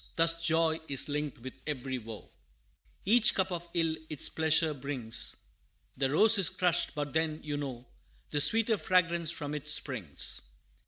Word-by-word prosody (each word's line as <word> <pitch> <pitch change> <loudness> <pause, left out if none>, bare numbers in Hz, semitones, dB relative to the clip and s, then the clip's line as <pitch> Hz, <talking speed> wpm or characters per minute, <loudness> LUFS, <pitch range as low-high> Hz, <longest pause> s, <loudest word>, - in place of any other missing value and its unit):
Thus 165 0 +2
joy 165 -1 +1
is 140 +1 0
linked 150 -1 -3
with 130 - -7
every 130 -3 -3
woe 110 -2 -10 0.7
Each 235 +4 +4
cup 190 -1 0
of 175 -1 -5
ill 165 -2 +1
its 155 -3 +1
pleasure 160 0 +1
brings; 130 -5 -4 0.6
The 135 0 0
rose 215 +9 +7
is 185 - +4
crushed, 180 -2 0
but 145 -2 -4
then, 160 -1 0
you 150 -1 -4
know, 130 -4 -6 0.5
The 145 - +3
sweeter 225 +5 +5
fragrance 170 -3 +1
from 150 -3 -4
it 150 0 -6
springs. 125 - -2
155 Hz, 155 wpm, -30 LUFS, 140-170 Hz, 0.7 s, rose